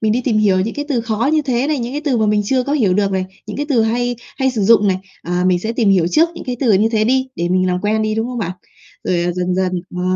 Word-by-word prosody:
mình 215 -1 +1
đi 245 - +1
tìm 225 -4 +1
hiểu 195 -3 +3
những 220 +4 -2
cái 290 - -3
từ 260 -5 0
khó 225 +3 -1
như 310 -1 +2
thế 255 -1 0
này, 300 -2 0
những 240 +2 -4
cái 295 - -2
từ 265 -5 +1
mà 220 - +2
mình 210 0 +2
chưa 255 +3 +1
có 280 - -3
hiểu 210 -11 +2
được 200 -1 +1
này, 190 -1 0 0.2
những - - -6
cái 290 +1 -2
từ 240 -6 +3
hay 245 +2 0 0.2
hay 265 -1 +1
sử 225 -5 -2
dụng 210 0 +5
này. 185 - +2 0.3
À, 180 +1 -1
mình 180 -1 +3
sẽ 220 +5 -3
tìm 230 -3 +1
hiểu 180 -4 +3
trước 325 - +3
những - - -8
cái 250 -1 -3
từ 235 -6 +3
như 210 +3 +3
thế 215 -1 +2
đi, 260 +2 +1
để 175 0 -1
mình 185 0 +2
làm 180 0 0
quen 215 +1 0
đi, 215 0 -1
đúng 225 +1 -1
không 250 0 -5
bạn? 185 -5 -2 0.5
Rồi, 175 -1 0
à, 175 0 0
dần 180 0 -1
dần 185 -1 0 0.2
ờ, 180 - -2
220 Hz, 320 wpm, -18 LUFS, 185-250 Hz, 0.5 s, dụng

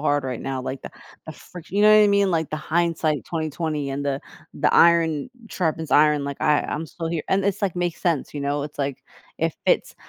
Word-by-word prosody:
hard 145 -2 +1
right 125 -3 -4
now, 135 -1 -3
like, 130 +1 -5
the - - -8 0.3
the - - -8
frict 170 +1 -12
you 200 - 0
know 215 0 +7
what 215 - +7
I 210 - +5
mean, 200 -2 +3
like, 160 -2 -1
the 155 - -2
hindsight 160 -2 0
20/20 155 -2 -2
and 140 +1 -3
the 140 -1 -1 0.3
the - - +1
iron 165 - +4 0.2
sharpens 160 -4 -2
iron, 150 -1 +4
like, 140 0 -5
I 150 -1 +3
I'm 155 - -4
still 165 +1 -6
here, 165 -2 -2
and 195 0 +1
it's, 200 +1 -1
like, 185 -3 -1
makes 175 -2 -2
sense, 165 -6 -1
you 145 - -4
know, 140 +1 -1
it's, 150 - -9
like, 140 -1 -3 0.3
if - - 0
it's - - +2
155 Hz, 225 wpm, -23 LUFS, 145-170 Hz, 0.3 s, know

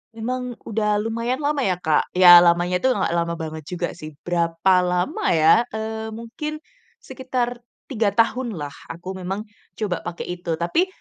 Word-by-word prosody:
Memang 250 +2 -4
udah 210 -1 0
lumayan 230 +5 -2
lama 290 0 0
ya 190 -9 +1
Ka, 155 -1 +3 0.2
ya 175 -1 +10
lamanya 175 +1 +3
itu 260 - +1
nggak - - 0
lama 170 0 0
banget 160 -1 -6
juga 180 -1 -2
sih. 155 -2 -10
Berapa 175 +1 +2
lama 180 0 -1
ya, 160 +10 +5
eee, 220 0 -4
mungkin 300 +7 -6 0.4
sekitar 250 -2 -3 0.3
3 220 -5 +1
tahunlah 225 - 0 0.2
aku 185 +3 -7
memang 195 +3 -4 0.3
coba 200 -5 -2
pakai 175 +1 -5
itu. 170 -2 -2
Tapi 175 - +1
190 Hz, 155 wpm, -22 LUFS, 175-230 Hz, 0.4 s, ya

